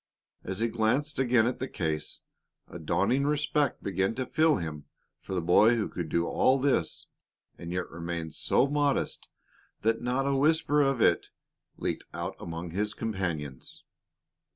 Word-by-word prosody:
As 95 Hz, +3 st, -4 dB
he 115 Hz, -, +3 dB
glanced 120 Hz, +7 st, 0 dB
again 120 Hz, -3 st, +4 dB
at 125 Hz, -, -1 dB
the 130 Hz, -, -2 dB
case, 80 Hz, -9 st, -3 dB, 0.5 s
a -, -, -9 dB
dawning 95 Hz, -, +1 dB
respect 150 Hz, 0 st, 0 dB
began 95 Hz, +2 st, 0 dB
to 130 Hz, -, -2 dB
fill 155 Hz, +2 st, +3 dB
him 75 Hz, -4 st, -5 dB, 0.3 s
for 95 Hz, -, -6 dB
the 90 Hz, -, -1 dB
boy 105 Hz, +7 st, +5 dB
who 110 Hz, -3 st, -1 dB
could 85 Hz, -3 st, -5 dB
do 85 Hz, +1 st, +1 dB
all 130 Hz, +8 st, +3 dB
this 130 Hz, -, 0 dB, 0.5 s
and 85 Hz, 0 st, -6 dB
yet 90 Hz, 0 st, -2 dB
remain 85 Hz, -1 st, -5 dB
so 100 Hz, -, +2 dB
modest 145 Hz, 0 st, 0 dB, 0.5 s
that 115 Hz, +1 st, +1 dB
not 125 Hz, +3 st, 0 dB
a 140 Hz, 0 st, +1 dB
whisper 150 Hz, +1 st, +3 dB
of 135 Hz, -4 st, +1 dB
it 85 Hz, -, +3 dB, 0.5 s
leaked -, -, -3 dB
out -, -, -4 dB
among 85 Hz, 0 st, -6 dB
his 105 Hz, +4 st, -2 dB
companions. 85 Hz, -, -4 dB
110 Hz, 155 wpm, -29 LUFS, 85-135 Hz, 0.5 s, boy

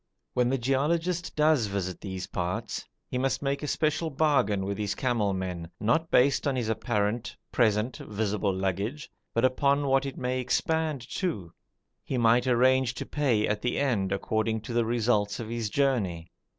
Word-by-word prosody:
When 125 Hz, -1 st, +2 dB
the 135 Hz, -, +1 dB
geologist 160 Hz, +8 st, 0 dB
does 150 Hz, -6 st, +3 dB
visit 95 Hz, -2 st, -3 dB
these 95 Hz, -1 st, -5 dB
parts 90 Hz, 0 st, -3 dB, 0.2 s
he 125 Hz, -, -2 dB
must 135 Hz, +2 st, 0 dB
make 140 Hz, 0 st, -1 dB
a 150 Hz, -, -3 dB
special 155 Hz, +2 st, 0 dB
bargain 135 Hz, -10 st, +2 dB
with 100 Hz, +1 st, -3 dB
his 105 Hz, -1 st, -1 dB
camel 115 Hz, -6 st, +1 dB
men, 90 Hz, -3 st, -4 dB
not 160 Hz, +10 st, +1 dB
based 140 Hz, +3 st, +3 dB
on 140 Hz, -, +1 dB
his 120 Hz, -3 st, -1 dB
apparent, 110 Hz, 0 st, -1 dB
present, 110 Hz, +1 st, +2 dB
visible 105 Hz, -2 st, -1 dB
baggage, 100 Hz, +10 st, -2 dB, 0.2 s
but 115 Hz, +2 st, +3 dB
upon 140 Hz, +2 st, +2 dB
what 135 Hz, 0 st, +2 dB
it 135 Hz, -, -6 dB
may 130 Hz, 0 st, -1 dB
expand 155 Hz, +1 st, 0 dB
to. 105 Hz, -, -3 dB, 0.5 s
He 130 Hz, -, -3 dB
might 120 Hz, +2 st, +4 dB
arrange 130 Hz, 0 st, +3 dB
to -, -, -5 dB
pay 125 Hz, -8 st, +1 dB
at 105 Hz, 0 st, -1 dB
the 125 Hz, -, -1 dB
end 110 Hz, -9 st, +1 dB
according 110 Hz, +3 st, 0 dB
to 115 Hz, +2 st, -6 dB
the 120 Hz, -1 st, +2 dB
results 110 Hz, -3 st, +1 dB
of 115 Hz, -2 st, -5 dB
his 115 Hz, -2 st, -2 dB
journey. 100 Hz, -11 st, 0 dB
120 Hz, 170 wpm, -28 LUFS, 105-135 Hz, 0.5 s, might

